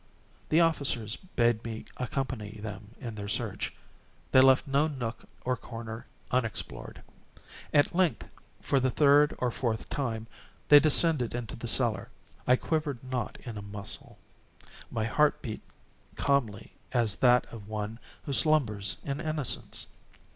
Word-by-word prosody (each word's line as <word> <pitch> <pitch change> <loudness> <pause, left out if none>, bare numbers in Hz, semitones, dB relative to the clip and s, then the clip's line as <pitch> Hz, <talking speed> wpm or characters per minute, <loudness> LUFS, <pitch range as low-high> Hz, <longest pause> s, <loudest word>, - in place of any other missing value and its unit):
The 160 +2 +4
officers 140 -9 +5
bade 120 - 0
me 110 -1 -6
accompany 125 -5 -4
them 105 +1 -8
in 120 -4 -6
their 100 -1 -6
search. - - -3 0.6
They 130 - +7
left 130 0 +5
no 140 +3 +2
nook 125 -6 -5 0.2
or 125 0 +1
corner 115 -2 -8 0.2
unexplored. 115 - -3 0.7
At 145 -1 +3
length, 180 -2 +1 0.4
for 140 - +2
the 130 0 +1
third 145 +2 +4
or 125 -1 0
fourth 115 -2 -2
time, 115 -6 -2 0.4
they 145 - +10
descended 150 -4 +3
into 120 -3 -5
the - - -6
cellar. - - +1 0.4
I 125 - +6
quivered 145 -3 -2
not 130 -3 -4
in 115 -5 -6
a - - -7
muscle. 100 0 -7 0.7
My 110 - -2
heart 145 +7 +2
beat 110 -5 -5 0.5
calmly 115 -7 -1 0.2
as 115 -6 +2
that 125 -1 +4
of 105 -3 -9
one 110 +1 -4 0.2
who 140 - -4
slumbers 115 -7 +2
in 140 +2 -3
innocence. 155 -5 -1
125 Hz, 140 wpm, -29 LUFS, 110-140 Hz, 0.7 s, they